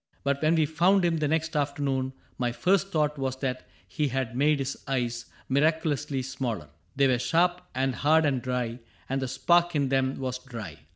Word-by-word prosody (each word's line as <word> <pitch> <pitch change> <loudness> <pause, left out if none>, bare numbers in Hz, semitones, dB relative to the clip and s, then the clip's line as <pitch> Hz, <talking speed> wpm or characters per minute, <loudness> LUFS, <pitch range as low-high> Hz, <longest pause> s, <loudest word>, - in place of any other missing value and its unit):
But 140 0 0
when 155 +2 +3
we 160 -2 +3
found 175 +5 +3
him 170 -1 +2
the 155 -1 0
next 160 +1 -1
afternoon. 140 -2 -1 0.3
My 120 -1 +1
first 195 +9 +2
thought 150 -3 0
was 130 -1 -1
that 130 -1 -4 0.2
he 150 -2 -1
had 130 -2 -2
made 145 +3 +3
his 135 -1 -2
eyes 120 -3 -1 0.2
Miraculously 150 -1 +1
smaller. 115 - -4 0.3
They 140 - +4
were 125 -2 +3
sharp 175 +7 +2
And 130 0 +1
hard 155 +4 +3
and 135 -4 +1
dry, 125 -1 -2 0.3
and 135 +1 -1
the 130 - -1
spark 170 +6 +2
in 140 -2 +1
them 135 0 +1
was 130 -1 -3
dry. 115 - -8
135 Hz, 185 wpm, -27 LUFS, 130-155 Hz, 0.3 s, They